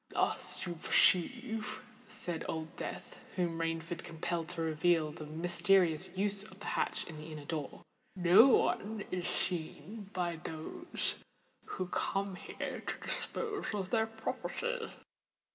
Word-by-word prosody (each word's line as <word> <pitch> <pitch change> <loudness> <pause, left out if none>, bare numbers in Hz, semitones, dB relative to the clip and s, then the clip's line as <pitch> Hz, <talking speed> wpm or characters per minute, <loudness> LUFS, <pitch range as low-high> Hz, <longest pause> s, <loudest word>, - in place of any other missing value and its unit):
"Thus, - - +2
you 175 - -2
perceive," 220 +2 +3 0.3
said 175 -6 -3
Old 160 0 -4
Death, - - -6 0.2
whom 170 -3 0
Rainford 165 +1 -2
compelled 165 0 -2
to 165 -2 -1
reveal 160 0 +3
the 155 -1 -8
mysterious 175 +1 +3
use 200 0 +2
of 190 -1 -13
the 205 - -8
hatch - - 0
in 160 - -8
the 155 +1 -8
inner 150 -2 -7
door, 150 -2 -4 0.3
"no 180 +6 +8
one 220 -4 +2
is 180 -1 -1
seen 180 +4 -3
by 175 -4 -1
those 160 - -3 0.5
who 185 - -3
come 195 +2 -1
here 180 - -5
to - - -4
dispose 425 -3 -2
of 195 -2 -3
their 225 -1 +3
property." 465 - -3
175 Hz, 135 wpm, -34 LUFS, 165-205 Hz, 0.5 s, no